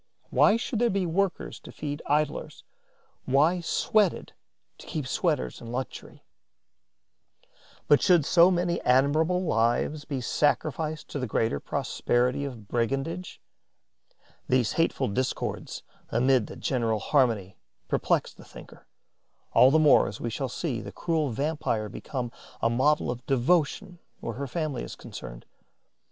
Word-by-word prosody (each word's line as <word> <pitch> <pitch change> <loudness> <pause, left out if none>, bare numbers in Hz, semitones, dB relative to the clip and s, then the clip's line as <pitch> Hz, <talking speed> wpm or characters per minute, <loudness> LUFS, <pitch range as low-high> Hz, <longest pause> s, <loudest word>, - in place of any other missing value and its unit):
Why 215 - +5
should 230 -1 -3
there 240 0 +3
be 195 -2 0
workers 185 +2 -1
to - - -12
feed 145 0 -5
idlers, 150 +1 -1 0.6
why 150 +7 +3
sweated 195 +3 +1 0.5
to - - -13
keep 150 -4 -3
sweaters 150 +2 -1
in 115 - -9
luxury? 130 +1 -6 1.6
Why 145 - +6
should 175 -4 +4
so 170 +3 +6
many 175 -1 0
admirable 155 +8 +2
lives 120 +2 0
be 140 -3 -3
sacrificed 150 +4 0
to 145 - -4
the 130 - -2
greater 110 -8 0
prosperity 125 - 0
of 120 -7 -8
brigandage? 135 - -2 1.1
These 125 -3 +2
hateful 165 - +1
discords 130 +6 -3 0.3
amid 125 -1 +2
the - - -9
general 115 -7 0
harmony 110 - +1 0.3
perplex - - 0
the - - -15
thinker, - - -14 0.7
all 130 - +7
the 150 - +4
more 155 -2 +5
as 105 - -7
we 120 - -3
shall 135 +3 -3
see 125 -3 -3
the - - -8
cruel 160 -4 -1
vampire 125 -5 -2
become 125 +3 -5 0.3
a 115 - +1
model 135 +2 +2
of 120 0 -7
devotion 170 - +1 0.2
where 115 - -5
her 140 +4 -5
family 150 -2 -3
is - - -7
concerned. - - -10
140 Hz, 135 wpm, -27 LUFS, 120-165 Hz, 1.6 s, all